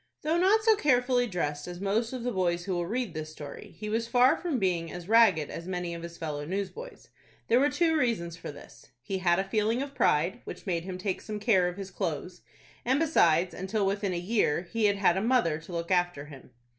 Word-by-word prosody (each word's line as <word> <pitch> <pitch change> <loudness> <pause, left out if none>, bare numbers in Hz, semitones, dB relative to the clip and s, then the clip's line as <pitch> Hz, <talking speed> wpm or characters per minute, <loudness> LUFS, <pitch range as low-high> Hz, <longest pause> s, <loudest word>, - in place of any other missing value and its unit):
Though 320 +3 +1
not 410 +4 +4
so 445 -1 +5
carefully 250 -7 +2
dressed 150 -6 -3
as 175 0 -7
most 210 +4 0
of 255 -2 -5
the 245 - -1
boys 175 -3 0
who 190 - -2
will 175 -1 -1
read 235 -2 -2
this 155 -1 -5
story, 145 -2 -10
he 210 - -6
was 225 +2 -1
far 250 +2 +5
from 335 -7 -2
being 175 -5 0
as 175 0 -8
ragged 205 -9 +4
as 170 - -7
many 180 -2 -3
of 170 - -6
his 170 0 -8
fellow 150 -3 -4
newsboys. 200 - -6 0.4
There 235 - +5
were 285 +2 +3
two 325 0 +2
reasons 225 - 0
for 165 - -7
this: 145 - -14 0.2
he 190 +7 -3
had 175 -1 +3
a 190 - +1
feeling 215 +4 0
of 280 +1 -4
pride, 175 - +1
which - - -9
made 170 -3 -2
him 185 -1 -5
take 185 0 -3
some 215 -1 -5
care 200 -5 +3
of 180 +1 -5
his 195 -1 -7
clothes, 175 0 -4 0.4
and 260 +3 +2
besides, 175 - +3
until 195 +2 -2
within 200 0 -1
a 175 - -2
year, 175 -3 +1
he 220 +4 -1
had 205 -1 +3
had 190 -3 +3
a - - 0
mother 225 -10 +2
to 165 +3 -13
look 170 +1 -4
after 175 -5 +1
him. 140 -3 -13
190 Hz, 230 wpm, -28 LUFS, 170-235 Hz, 0.4 s, so